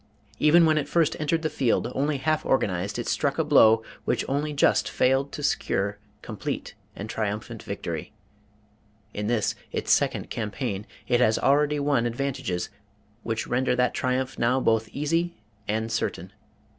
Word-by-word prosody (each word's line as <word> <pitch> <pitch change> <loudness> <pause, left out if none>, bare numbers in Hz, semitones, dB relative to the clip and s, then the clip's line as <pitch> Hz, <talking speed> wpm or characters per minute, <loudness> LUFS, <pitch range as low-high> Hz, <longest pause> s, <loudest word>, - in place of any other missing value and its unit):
Even 165 +3 +6
when 155 -1 +3
it 145 - -3
first 165 -2 +2
entered 160 +2 0
the - - +2
field, 130 -5 +1
only 145 +1 0
half 155 +4 0
organized, 100 -6 0
it 120 - -4
struck 140 -1 0
a 160 - +2
blow 115 -7 +5 0.2
which - - 0
only 145 +2 -1
just 145 - +2
failed 135 +2 +2
to 145 - -6
secure 100 -7 0 0.2
complete 110 -3 -5 0.2
and 100 - -6
triumphant 105 -1 -3
victory. - - -5 1.0
In 105 0 -3
this, 115 -2 +1 0.2
its - - -1
second - - +1
campaign, 105 -2 -3 0.2
it 120 - +3
has 110 -3 +4
already 145 +1 +3
won 140 -5 +2
advantages 120 -8 -3 0.5
which 115 0 -2
render 125 +1 +1
that 125 0 +2
triumph 130 +1 -1
now 120 +3 +2
both 110 -3 +1
easy 165 +4 -1 0.3
and 110 +2 -1
certain. 95 -4 -3
130 Hz, 155 wpm, -26 LUFS, 110-145 Hz, 1.0 s, Even